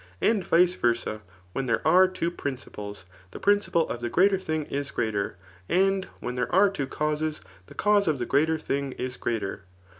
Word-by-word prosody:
And 215 Hz, -4 st, +2 dB
vice 175 Hz, +1 st, +4 dB
versa, 120 Hz, -7 st, -1 dB, 0.3 s
when 135 Hz, -1 st, -2 dB
there 115 Hz, +5 st, 0 dB
are 185 Hz, +4 st, +7 dB
two 185 Hz, -2 st, -2 dB
principles, 105 Hz, -, -6 dB, 0.2 s
the -, -, -9 dB
prmciple 205 Hz, -5 st, +2 dB
of 120 Hz, -, -4 dB
the 120 Hz, -, -2 dB
greater 195 Hz, -, +4 dB
thing 155 Hz, -4 st, -2 dB
is 140 Hz, 0 st, -3 dB
greater; 105 Hz, -5 st, -2 dB, 0.3 s
and 190 Hz, +1 st, +2 dB
when 125 Hz, -, -4 dB
there 125 Hz, -, -2 dB
are 195 Hz, +2 st, +5 dB
two 140 Hz, -9 st, -3 dB
tauses, 150 Hz, +1 st, -2 dB, 0.3 s
the -, -, -14 dB
cause 205 Hz, -2 st, +3 dB
of 155 Hz, -3 st, +2 dB
the 120 Hz, -, -2 dB
greater 160 Hz, +5 st, +2 dB
thing 140 Hz, -3 st, -2 dB
is 125 Hz, 0 st, -4 dB
greater. 100 Hz, -5 st, -3 dB
150 Hz, 180 wpm, -26 LUFS, 120-185 Hz, 0.3 s, are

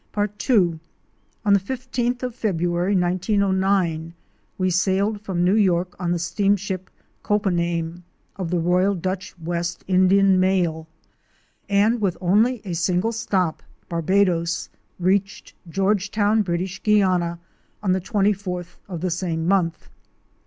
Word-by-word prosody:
Part 210 Hz, +3 st, -3 dB
II. 180 Hz, -9 st, +3 dB, 0.7 s
On 205 Hz, -, +5 dB
the 200 Hz, -, +5 dB
15th 245 Hz, +3 st, -3 dB
of 250 Hz, -1 st, -2 dB
February, 175 Hz, -4 st, 0 dB
1909, 185 Hz, -2 st, +1 dB, 0.4 s
we 185 Hz, -1 st, +1 dB
sailed 195 Hz, +4 st, +1 dB
from 190 Hz, -4 st, -1 dB
New 180 Hz, +2 st, +3 dB
York 180 Hz, -4 st, +2 dB
on 175 Hz, -2 st, -1 dB
the 175 Hz, -, +1 dB
Steamship 195 Hz, +1 st, -1 dB, 0.2 s
'' -, -, -42 dB
Coppename 175 Hz, -4 st, -1 dB, 0.2 s
"' -, -, -42 dB
of 185 Hz, -4 st, -4 dB
the 175 Hz, -, 0 dB
Royal 180 Hz, +4 st, +2 dB
Dutch 185 Hz, +1 st, -4 dB
West 170 Hz, +1 st, -3 dB
Indian 190 Hz, +1 st, +4 dB
Mail, 175 Hz, -4 st, +1 dB, 0.8 s
and 210 Hz, +3 st, +3 dB
with 190 Hz, -4 st, 0 dB
only 215 Hz, +6 st, +2 dB
a 180 Hz, -, -4 dB
single 180 Hz, +5 st, +1 dB
stop 190 Hz, -7 st, -1 dB
— -, -, -39 dB
Barbadoes 170 Hz, -1 st, +1 dB
— -, -, -43 dB
reached 195 Hz, +1 st, -1 dB, 0.2 s
Georgetown, 205 Hz, +3 st, +1 dB
British 185 Hz, 0 st, -3 dB
Guiana, 185 Hz, -5 st, +2 dB, 0.5 s
on 190 Hz, -, +2 dB
the 185 Hz, 0 st, +1 dB
24th 195 Hz, -3 st, -1 dB
of 175 Hz, -4 st, -5 dB
the 185 Hz, -1 st, -1 dB
same 165 Hz, -2 st, -2 dB
month. 175 Hz, -4 st, +1 dB
185 Hz, 135 wpm, -23 LUFS, 175-200 Hz, 0.8 s, On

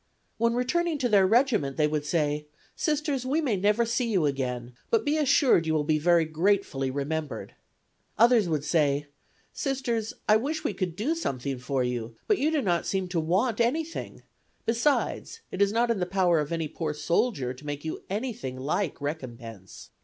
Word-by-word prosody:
When 230 Hz, +1 st, +2 dB
returning 325 Hz, +6 st, 0 dB
to 260 Hz, -3 st, 0 dB
their 200 Hz, -4 st, +5 dB
regiment 220 Hz, -, +2 dB
they 155 Hz, -, +3 dB
would 150 Hz, -1 st, -1 dB
say: 150 Hz, -2 st, 0 dB, 0.3 s
"Sisters, 300 Hz, -4 st, -1 dB
we 270 Hz, +5 st, 0 dB
may 270 Hz, -9 st, +1 dB
never 210 Hz, +4 st, +2 dB
see 235 Hz, +1 st, 0 dB
you 185 Hz, -7 st, +2 dB
again, 125 Hz, -3 st, -2 dB, 0.2 s
but 455 Hz, -, +2 dB
be 290 Hz, +1 st, +2 dB
assured 270 Hz, -, +4 dB
you 160 Hz, -, +1 dB
will 150 Hz, -, +1 dB
be 155 Hz, 0 st, +1 dB
very 170 Hz, +1 st, +4 dB
gratefully 160 Hz, -4 st, 0 dB
remembered." 145 Hz, +2 st, -4 dB, 0.6 s
Others 230 Hz, -5 st, +5 dB
would 155 Hz, -3 st, 0 dB
say: 145 Hz, -3 st, +2 dB, 0.5 s
"Sisters, 250 Hz, -6 st, -2 dB
I 215 Hz, -, +6 dB
wish 305 Hz, +7 st, -3 dB
we 300 Hz, -, -1 dB
could 180 Hz, -4 st, -3 dB
do 240 Hz, -, 0 dB
something 135 Hz, -, -3 dB
for 130 Hz, +1 st, -1 dB
you, 120 Hz, -2 st, -3 dB
but 420 Hz, -, +2 dB
you 300 Hz, -, +2 dB
do 310 Hz, -4 st, 0 dB
not 175 Hz, -4 st, 0 dB
seem 190 Hz, -2 st, -1 dB
to 175 Hz, -2 st, 0 dB
want 195 Hz, +9 st, +1 dB
anything; 310 Hz, +8 st, -2 dB, 0.4 s
besides, 285 Hz, -, 0 dB
it 185 Hz, -, -3 dB
is 200 Hz, 0 st, +4 dB
not 235 Hz, +2 st, +2 dB
in 225 Hz, -, 0 dB
the 180 Hz, -, -1 dB
power 180 Hz, -3 st, +2 dB
of 150 Hz, 0 st, -3 dB
any 165 Hz, -2 st, -1 dB
poor 155 Hz, 0 st, -4 dB
soldier 150 Hz, -, 0 dB
to 130 Hz, -, -15 dB
make 145 Hz, +1 st, -5 dB
you 160 Hz, -, -4 dB
anything 210 Hz, -, -4 dB
like 150 Hz, +6 st, -2 dB
recompense. 120 Hz, -, -7 dB
185 Hz, 185 wpm, -27 LUFS, 150-240 Hz, 0.6 s, I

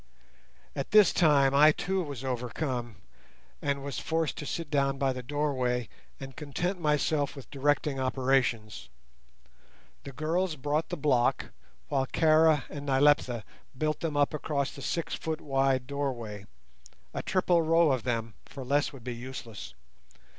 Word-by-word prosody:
At -, -, -3 dB
this 210 Hz, -2 st, +6 dB
time, 140 Hz, -5 st, +4 dB
I 150 Hz, +2 st, +7 dB
too 190 Hz, +5 st, -1 dB
was 140 Hz, -6 st, -6 dB
overcome, 125 Hz, -1 st, -3 dB, 0.7 s
and 140 Hz, -1 st, -1 dB
was 140 Hz, -1 st, -4 dB
forced 160 Hz, -1 st, -1 dB
to 150 Hz, -, -5 dB
sit 165 Hz, -3 st, -4 dB
down 140 Hz, -1 st, +1 dB
by 135 Hz, -1 st, +1 dB
the 125 Hz, -, -6 dB
doorway, 130 Hz, -3 st, -1 dB, 0.3 s
and 135 Hz, -1 st, -8 dB
content 175 Hz, +6 st, -3 dB
myself 150 Hz, -1 st, +1 dB
with 135 Hz, -, -11 dB
directing 145 Hz, 0 st, 0 dB
operations. 130 Hz, -4 st, 0 dB, 1.1 s
The 140 Hz, -, -8 dB
girls 160 Hz, +4 st, -1 dB
brought 150 Hz, +3 st, -1 dB
the -, -, -3 dB
block, 130 Hz, -5 st, +1 dB, 0.4 s
while 135 Hz, -2 st, 0 dB
Kara 155 Hz, -1 st, +4 dB
and 145 Hz, -1 st, -7 dB
Nyleptha 135 Hz, -4 st, +3 dB, 0.3 s
built 155 Hz, +2 st, -1 dB
them 155 Hz, -3 st, -2 dB
up 145 Hz, +1 st, +2 dB
across 145 Hz, -2 st, -2 dB
the 140 Hz, -, -10 dB
six 165 Hz, +5 st, -2 dB
foot 160 Hz, -1 st, -3 dB
wide 135 Hz, -2 st, +1 dB
doorway, 120 Hz, -8 st, -4 dB, 0.7 s
a -, -, -3 dB
triple 180 Hz, -2 st, +2 dB
row 165 Hz, -1 st, +4 dB
of 130 Hz, -3 st, 0 dB
them, 115 Hz, -2 st, -2 dB
for 135 Hz, -, -9 dB
less 140 Hz, +2 st, +1 dB
would 135 Hz, -5 st, -12 dB
be 125 Hz, 0 st, -4 dB
useless. 120 Hz, -, -8 dB
140 Hz, 145 wpm, -29 LUFS, 130-155 Hz, 1.1 s, I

